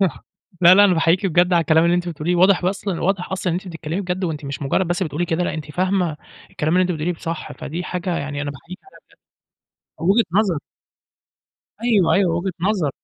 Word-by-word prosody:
صح. 185 -7 -1 0.4
لا، 175 +1 +8
لا. 205 +1 +7
أنا 185 - +4
باحييكِ 165 +4 +2
بجد 180 +1 +2
على 170 - +5
الكلام 160 0 +3
اللي 170 - +3
أنتِ 175 0 -2
بتقوليه. 170 +2 -2
واضح 185 0 +4
أصلًا 195 -1 -2
واضح 190 0 -1
أصلًا 185 -1 -1
إن 175 - 0
أنتِ 190 - -11
بتتكلّمي 165 +1 -4
بجد 185 0 -3
وأنتِ 155 -3 -4
مش 140 +1 -5
مُجرّد 165 +6 0
بس 175 +3 -1
بتقولي 165 0 -2
كده، 165 +2 0
لأ - - -2
أنتِ 150 -2 -7
فاهمة 180 -2 0 0.3
الكلام 155 +2 -2
اللي 185 - +4
أنتِ 180 - 0
بتقوليه 165 +2 -2
ب 165 - -12
صح. 165 -1 -5
فدي 170 +5 -6
حاجة 180 -1 -3
يعني 145 0 -4
أنا 145 - -3
باحييكِ 170 +6 -11
عليها 390 - -18 1.0
بجد. 170 +3 0
وجهة 230 +2 +3
نظر. 190 -7 +1 1.3
أيوه، 215 -8 +3
أيوه. 185 -4 +2
وجهة 185 +2 -2
نظر. 185 -6 0
175 Hz, 215 wpm, -21 LUFS, 160-185 Hz, 1.3 s, لا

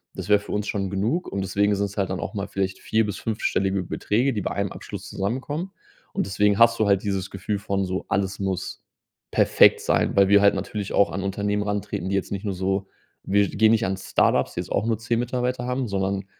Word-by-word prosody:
Das - - -6
wäre 105 - +7
für 105 - -10
uns 105 0 -2
schon 100 -2 -2
genug 115 - -1
und 100 0 -3
deswegen 100 +2 +1
sind's 100 0 -3
halt 95 -2 0
dann 95 - -3
auch 105 - -5
mal 100 0 -3
vielleicht 95 -1 -2
4 110 0 +1
bis 105 - -4
5- 110 -1 -4
stellige 95 0 +1
Beträge, 120 +9 0
die 105 -4 -2
bei - - -3
1 100 -1 -2
Abschluss - - -8
zusammenkommen. 140 - -3 0.4
Und - - -1
deswegen 100 +2 +2
hast 115 0 +6
du 110 - +3
halt 100 -1 +3
dieses 95 -2 -2
Gefühl 95 +2 -3
von 100 0 -1
so: 95 +1 -3
„Alles 95 0 0
muss 95 -2 -3 0.5
perfekt - - +5
sein”, - - +1
weil 100 -1 +5
wir 100 +1 +6
halt 100 0 +5
natürlich 105 -2 -4
auch 100 - +4
an 95 - -3
Unternehmen 100 +1 -1
rantreten, 100 -3 -3
die 100 - 0
jetzt 95 - -2
nicht 100 +1 -4
nur 100 - -1
so 95 +1 -1 0.4
wir 100 0 +2
gehen 110 +2 +4
nicht 115 -1 +2
an 95 0 -2
Start-ups, - - +1
die - - -4
jetzt - - -5
auch 105 - +1
nur 115 -2 0
10 115 +1 -1
Mitarbeiter 125 0 -2
haben, 125 0 -1
sondern 95 0 -1
100 Hz, 230 wpm, -24 LUFS, 95-110 Hz, 0.5 s, wäre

